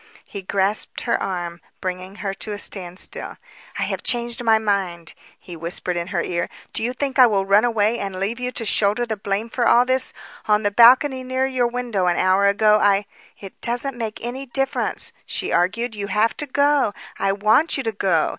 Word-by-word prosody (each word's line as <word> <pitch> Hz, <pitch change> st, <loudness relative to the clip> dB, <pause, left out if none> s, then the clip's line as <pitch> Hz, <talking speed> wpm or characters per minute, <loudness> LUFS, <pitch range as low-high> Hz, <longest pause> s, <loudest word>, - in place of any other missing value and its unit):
He 200 Hz, -, -7 dB
grasped 195 Hz, +2 st, -1 dB
her -, -, 0 dB
arm, 175 Hz, -3 st, -4 dB, 0.2 s
bringing 185 Hz, +1 st, -5 dB
her 195 Hz, -, -1 dB
to 210 Hz, +2 st, -5 dB
a -, -, -5 dB
standstill. 185 Hz, -3 st, -5 dB, 0.4 s
"I -, -, 0 dB
have -, -, -3 dB
changed 240 Hz, 0 st, -1 dB
my 225 Hz, -1 st, +5 dB
mind," 195 Hz, -6 st, -2 dB, 0.3 s
he 175 Hz, -, -10 dB
whispered 170 Hz, +2 st, -2 dB
in 170 Hz, 0 st, -3 dB
her -, -, -1 dB
ear. 170 Hz, -1 st, -2 dB, 0.2 s
"Do -, -, 0 dB
you 235 Hz, +2 st, 0 dB
think 270 Hz, 0 st, -2 dB
I 250 Hz, -, +9 dB
will 195 Hz, -3 st, +1 dB
run 200 Hz, +3 st, +4 dB
away 225 Hz, -1 st, +1 dB
and 195 Hz, -1 st, -4 dB
leave 210 Hz, +5 st, -2 dB
you 250 Hz, 0 st, -2 dB
to 230 Hz, -, -2 dB
shoulder 210 Hz, +3 st, +2 dB
the 225 Hz, -2 st, -3 dB
blame 200 Hz, +2 st, -2 dB
for 240 Hz, +1 st, 0 dB
all 245 Hz, +1 st, +5 dB
this? 260 Hz, 0 st, +1 dB, 0.4 s
On 210 Hz, 0 st, +3 dB
the 205 Hz, -, +1 dB
balcony 255 Hz, +4 st, +5 dB
near 260 Hz, +1 st, -1 dB
your 255 Hz, -2 st, +1 dB
window 235 Hz, -6 st, -2 dB
an 175 Hz, -, +2 dB
hour 190 Hz, +2 st, +3 dB
ago 210 Hz, +1 st, +4 dB
I 205 Hz, 0 st, +3 dB, 0.2 s
" -, -, -27 dB
"It 195 Hz, -2 st, -12 dB
doesn't 245 Hz, +3 st, -1 dB
make 225 Hz, -2 st, -4 dB
any 260 Hz, +3 st, -5 dB
difference," 270 Hz, +2 st, -1 dB
she -, -, -2 dB
argued. 225 Hz, +7 st, +1 dB
"You 205 Hz, -1 st, -5 dB
have 215 Hz, +3 st, +1 dB
to 295 Hz, -, -3 dB
go. 285 Hz, -4 st, +2 dB, 0.2 s
I 195 Hz, -, +1 dB
want 215 Hz, +12 st, +2 dB
you 270 Hz, -, -2 dB
to 225 Hz, -, -1 dB
go. 190 Hz, -6 st, +1 dB
215 Hz, 205 wpm, -21 LUFS, 195-245 Hz, 0.4 s, I